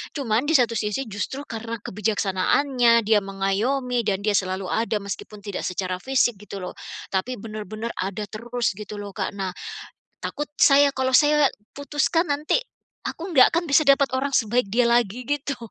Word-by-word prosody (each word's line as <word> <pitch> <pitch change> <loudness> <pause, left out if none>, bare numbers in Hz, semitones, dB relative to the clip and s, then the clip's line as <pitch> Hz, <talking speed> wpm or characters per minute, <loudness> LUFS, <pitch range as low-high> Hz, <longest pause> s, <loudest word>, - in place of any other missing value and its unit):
cuman 250 -2 0
di 320 - +3
satu 235 -4 +3
sisi 210 +5 -1
justru 265 +8 -4
karena 230 -3 -5
kebijaksanaannya, 225 +5 +2
dia 215 0 +4
mengayomi 205 +7 -1
dan 200 -1 0
dia 210 - +2
selalu 185 -1 -1
ada 225 0 0
meskipun 200 +1 -7
tidak 200 -2 -5
secara 185 0 -3
fisik, 250 -3 +1
gitu 200 -2 -8
loh, - - -5 0.4
tapi, 200 +7 -1
benar-benar 215 +1 -6
ada 195 +2 -2
terus, 240 +2 -2
gitu 210 0 -7
loh, 205 -1 -6
Kak. 200 - -4
Nah, 190 -2 -3 0.7
takut 295 0 -4
saya 280 0 +6
kalau 260 -1 +3
saya 295 -1 +5 0.2
putuskan 295 +4 0
nanti, 295 +10 +1 0.5
aku 330 - -6
nggak 260 -5 +7
akan 345 - +1
bisa 280 +1 +4
dapat 275 -1 +4
orang 270 +2 -1
sebaik 235 -2 +1
dia 235 +5 +2
lagi, 235 0 +1
gitu. 285 +1 -2
230 Hz, 165 wpm, -24 LUFS, 205-275 Hz, 0.7 s, nggak